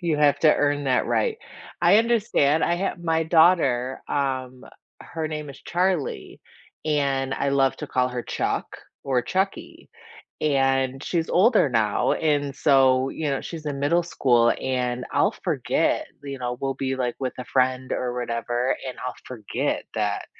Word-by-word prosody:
You 170 Hz, -4 st, 0 dB
have 145 Hz, -1 st, +4 dB
to 155 Hz, -2 st, +6 dB
earn 145 Hz, -1 st, 0 dB
that 130 Hz, -2 st, +1 dB
right. 455 Hz, -3 st, 0 dB, 0.4 s
I 175 Hz, +5 st, +6 dB
understand 210 Hz, -10 st, +2 dB
I 170 Hz, -, +1 dB
have 190 Hz, -1 st, -2 dB
my 165 Hz, -1 st, +1 dB
daughter, 160 Hz, -7 st, +3 dB
um, 130 Hz, -2 st, -2 dB, 0.4 s
her 160 Hz, -1 st, -5 dB
name 150 Hz, -2 st, -5 dB
is 140 Hz, -, -13 dB
Charlie 180 Hz, -3 st, -1 dB, 0.4 s
and 140 Hz, -3 st, 0 dB
I 140 Hz, -, -1 dB
love 135 Hz, -1 st, +2 dB
to -, -, -5 dB
call 125 Hz, 0 st, +1 dB
her 125 Hz, -1 st, -4 dB
Chuck -, -, -2 dB, 0.4 s
or 130 Hz, -3 st, +1 dB
Chuckie 190 Hz, +9 st, -3 dB, 0.5 s
and 135 Hz, -2 st, +1 dB
she's 165 Hz, -2 st, -1 dB
older 210 Hz, -, +4 dB
now, 115 Hz, -3 st, +1 dB
and 145 Hz, -3 st, 0 dB
so 135 Hz, -2 st, +4 dB
you 155 Hz, 0 st, -3 dB
know, 135 Hz, -, -1 dB
she's 160 Hz, -3 st, -8 dB
in 140 Hz, -2 st, -3 dB
middle 170 Hz, +5 st, +2 dB
school 120 Hz, -8 st, +3 dB
and 125 Hz, -1 st, -2 dB
I'll -, -, +3 dB
forget -, -, 0 dB, 0.2 s
you 140 Hz, -1 st, -6 dB
know, 125 Hz, 0 st, -3 dB
we'll 135 Hz, 0 st, -1 dB
be, 135 Hz, 0 st, -2 dB
like, 125 Hz, -2 st, -1 dB
with 130 Hz, -2 st, -3 dB
a 125 Hz, -, -5 dB
friend 130 Hz, 0 st, 0 dB
or 125 Hz, -1 st, -2 dB
whatever 120 Hz, +1 st, -1 dB
and 130 Hz, -, -5 dB
I'll 125 Hz, -, -4 dB
forget 115 Hz, -5 st, -3 dB
that -, -, -1 dB
135 Hz, 160 wpm, -24 LUFS, 130-160 Hz, 0.5 s, to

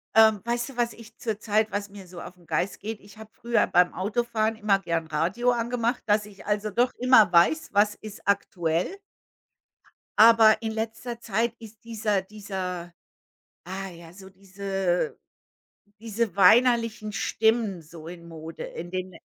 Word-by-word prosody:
Ähm, 220 Hz, -2 st, +6 dB
weißt 240 Hz, +2 st, -1 dB
du, 265 Hz, -, -12 dB
was 235 Hz, -1 st, 0 dB
ich 225 Hz, -1 st, -15 dB
zurzeit 215 Hz, -1 st, -1 dB
was 205 Hz, 0 st, -3 dB
mir 200 Hz, -2 st, -12 dB
so 175 Hz, -1 st, -10 dB
auf 180 Hz, -, -10 dB
'n 175 Hz, -, -22 dB
Geist 165 Hz, +4 st, -2 dB
geht? 220 Hz, +1 st, -6 dB
Ich 200 Hz, +1 st, -17 dB
habe 220 Hz, 0 st, -12 dB
früher 235 Hz, 0 st, +1 dB
beim 180 Hz, 0 st, +3 dB
Autofahren 220 Hz, +2 st, -1 dB
immer 210 Hz, -3 st, +2 dB
gerne 165 Hz, -4 st, -3 dB
Radio 190 Hz, +11 st, +1 dB
angemacht, 240 Hz, +1 st, -1 dB
dass 210 Hz, 0 st, +2 dB
ich, 200 Hz, -1 st, -15 dB
also, 210 Hz, 0 st, -1 dB
doch 245 Hz, +5 st, +1 dB
immer 250 Hz, -7 st, +6 dB
weiß: 245 Hz, -, +3 dB
„Was 205 Hz, +1 st, +3 dB
ist 215 Hz, -1 st, -11 dB
aktuell.“ 180 Hz, -, 0 dB, 1.2 s
Aber 220 Hz, 0 st, +7 dB
in 225 Hz, -1 st, -3 dB
letzter 225 Hz, +2 st, -5 dB
Zeit 230 Hz, +1 st, -1 dB
ist 225 Hz, -1 st, -14 dB
dieser 215 Hz, -3 st, -1 dB
dieser 185 Hz, -4 st, -6 dB, 0.7 s
ah, 190 Hz, +2 st, -5 dB
ja, 170 Hz, -1 st, -13 dB
so 190 Hz, +1 st, -13 dB
diese 195 Hz, -1 st, -2 dB, 0.8 s
diese 225 Hz, 0 st, -3 dB
weinerlichen 230 Hz, +1 st, +4 dB
Stimmen 220 Hz, -4 st, 0 dB
so 160 Hz, 0 st, -13 dB
in 170 Hz, -1 st, -10 dB
Mode, 160 Hz, 0 st, -9 dB
in 175 Hz, +1 st, -7 dB
den 185 Hz, 0 st, -4 dB
210 Hz, 155 wpm, -26 LUFS, 185-225 Hz, 1.2 s, Aber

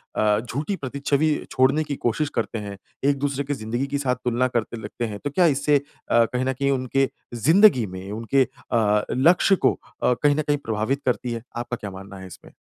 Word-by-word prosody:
अ, 105 Hz, -1 st, +2 dB
झूठी 145 Hz, -, -3 dB
प्रति 140 Hz, -4 st, -6 dB
छवि 150 Hz, +2 st, +3 dB, 0.2 s
छोड़ने 135 Hz, +4 st, +3 dB
की 145 Hz, -2 st, -4 dB
कोशिश 145 Hz, +6 st, +1 dB
करते 115 Hz, -, -3 dB
हैं, 100 Hz, -1 st, -7 dB, 0.3 s
एक-दूसरे 140 Hz, 0 st, -1 dB
की 145 Hz, +1 st, -2 dB
ज़िंदगी 120 Hz, +3 st, -3 dB
के 140 Hz, -, -2 dB
साथ 130 Hz, -3 st, 0 dB
तुलना 125 Hz, +1 st, +2 dB
करते 115 Hz, +1 st, -3 dB
लगते 115 Hz, +3 st, -4 dB
हैं। 105 Hz, -2 st, -6 dB
तो 145 Hz, -, -1 dB
क्या 175 Hz, +5 st, +3 dB
इससे 145 Hz, +1 st, +2 dB
अ, 135 Hz, -4 st, 0 dB
कहीं 125 Hz, +2 st, -2 dB
न 130 Hz, -, 0 dB
कहीं 140 Hz, +2 st, 0 dB
उनके 135 Hz, 0 st, +1 dB, 0.2 s
ज़िंदगी 155 Hz, -, +5 dB
में 95 Hz, +2 st, -8 dB
उनके 115 Hz, +5 st, +2 dB
अ, 110 Hz, -5 st, 0 dB
लक्ष्य 175 Hz, +8 st, +4 dB
को -, -, +2 dB, 0.3 s
अ, -, -, +4 dB
कहीं 145 Hz, -1 st, +5 dB
न 155 Hz, -, +1 dB
कहीं 145 Hz, -1 st, 0 dB
प्रभावित 115 Hz, +2 st, -2 dB
करती 125 Hz, 0 st, 0 dB
है? 115 Hz, 0 st, -6 dB
आपका 120 Hz, 0 st, -3 dB
क्या 105 Hz, -, -7 dB
मानना 95 Hz, +1 st, -10 dB
है 95 Hz, -, -9 dB
इसमें? -, -, -14 dB
130 Hz, 210 wpm, -23 LUFS, 115-145 Hz, 0.3 s, ज़िंदगी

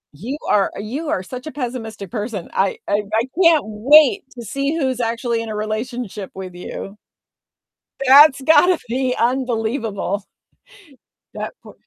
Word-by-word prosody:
You 245 Hz, -, -5 dB
are 200 Hz, -2 st, +2 dB
you 265 Hz, +10 st, -4 dB
are 185 Hz, -, -1 dB
such 255 Hz, +7 st, -8 dB
a -, -, -5 dB
pessimistic 235 Hz, -6 st, -6 dB
person. 210 Hz, -5 st, -4 dB
I 195 Hz, 0 st, +1 dB
I 205 Hz, +1 st, +1 dB, 0.2 s
I -, -, +1 dB, 0.2 s
can't 330 Hz, -3 st, +5 dB
wait 290 Hz, -, +5 dB
to 235 Hz, -, -6 dB
see 275 Hz, +7 st, -2 dB
who's 260 Hz, -4 st, -1 dB
actually 235 Hz, 0 st, -1 dB
in 225 Hz, -, -6 dB
a 215 Hz, -, -4 dB
relationship 215 Hz, -1 st, -4 dB
with 185 Hz, -2 st, -7 dB
you. 195 Hz, +3 st, -8 dB, 1.1 s
That's 280 Hz, +1 st, +7 dB
gotta 325 Hz, +5 st, +5 dB
be 255 Hz, +1 st, 0 dB
unbelievable. 225 Hz, -5 st, -1 dB, 1.1 s
That -, -, -5 dB
poo -, -, -13 dB
235 Hz, 140 wpm, -20 LUFS, 210-270 Hz, 1.1 s, That's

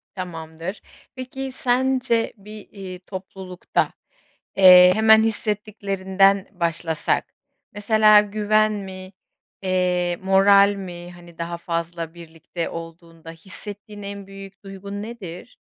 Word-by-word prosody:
Tamamdır. 165 Hz, 0 st, -7 dB, 0.3 s
Peki 260 Hz, +1 st, -6 dB
sence 255 Hz, -2 st, 0 dB
bir, 210 Hz, +1 st, -12 dB
eee, 190 Hz, -3 st, -9 dB
toplulukta, 185 Hz, -1 st, -4 dB, 0.6 s
eee, 180 Hz, -1 st, +9 dB
hemen 220 Hz, 0 st, +6 dB
hissettiklerinden 200 Hz, -3 st, 0 dB
başlasak 170 Hz, -3 st, -2 dB, 0.4 s
mesela 215 Hz, 0 st, +5 dB
güven 215 Hz, +1 st, +1 dB
mi, 190 Hz, -2 st, -8 dB, 0.5 s
eee, 180 Hz, -2 st, 0 dB
moral 200 Hz, +1 st, +5 dB
mi, 175 Hz, -2 st, -8 dB
hani, 175 Hz, -1 st, -16 dB
daha 170 Hz, 0 st, -4 dB
fazla 170 Hz, -1 st, -4 dB
birlikte 165 Hz, 0 st, -7 dB
olduğunda 165 Hz, 0 st, -10 dB
hissettiğin 205 Hz, +5 st, -8 dB
en 200 Hz, -1 st, -8 dB
büyük 195 Hz, 0 st, -12 dB
duygun 200 Hz, +1 st, -8 dB
nedir? 215 Hz, -2 st, -9 dB
195 Hz, 100 wpm, -22 LUFS, 175-210 Hz, 0.6 s, eee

